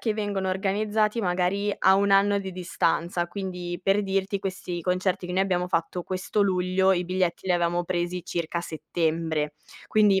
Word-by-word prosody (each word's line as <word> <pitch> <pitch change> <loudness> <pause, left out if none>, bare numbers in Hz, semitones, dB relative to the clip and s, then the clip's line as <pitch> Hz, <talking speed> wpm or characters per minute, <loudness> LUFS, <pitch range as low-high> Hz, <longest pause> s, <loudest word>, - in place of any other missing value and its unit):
che 220 - 0
vengono 205 -3 -2
organizzati, 210 +3 0
magari, 190 +2 0
a 190 - +5
1 200 +1 +2
anno 200 +1 +4
di 190 -1 -5
distanza. 175 -1 -1
Quindi, 180 -2 -5
per 195 +2 +2
dirti, 195 0 -1
questi 185 -2 -4
concerti 180 +1 0
che 180 - -3
noi 190 - +3
abbiamo 180 -2 0
fatto 170 +1 -1
questo 185 +3 -1
luglio, 185 0 +2
i 180 -1 0
biglietti 185 0 -1
li 185 - +3
avevamo 175 0 +1
presi 175 0 -2
circa 170 0 -2
a - - -2
settembre. 160 -1 -2 0.3
Quindi, 205 -3 +4
185 Hz, 170 wpm, -26 LUFS, 175-195 Hz, 0.3 s, a